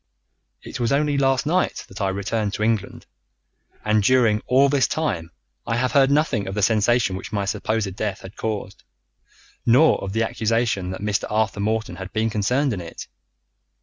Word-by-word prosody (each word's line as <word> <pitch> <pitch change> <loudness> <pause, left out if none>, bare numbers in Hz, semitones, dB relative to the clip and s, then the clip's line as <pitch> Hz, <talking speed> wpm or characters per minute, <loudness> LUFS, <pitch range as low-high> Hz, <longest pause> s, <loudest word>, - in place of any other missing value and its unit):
"It - - -7
was 120 0 0
only 145 +1 +2
last 135 -2 +2
night 180 +4 0
that 95 - -9
I 95 - +1
returned 100 +2 -2
to 105 - -2
England, 110 -2 -1 0.8
and 105 0 +3
during 115 -1 +3
all 135 +2 +5
this 140 -2 +2
time 100 - -2 0.4
I 115 - 0
have 125 +1 0
heard 135 -1 +4
nothing 140 -8 +1
of 95 - -4
the 105 - 0
sensation 110 -1 +2
which 95 - -7
my 100 -2 -1
supposed 100 -1 -2
death 105 -2 -3
had 95 - -11
caused, 105 -3 -5 0.8
nor 135 +7 +4
of 95 0 -4
the 115 +1 +1
accusation 110 -4 0
that 95 - -6
Mr. 105 -1 -1
Arthur 110 -2 0
Morton 110 +2 -1
had 95 0 -7
been 110 +1 0
concerned 125 +6 +1
in 95 - -4
it. 85 - -8
110 Hz, 180 wpm, -22 LUFS, 100-125 Hz, 0.8 s, all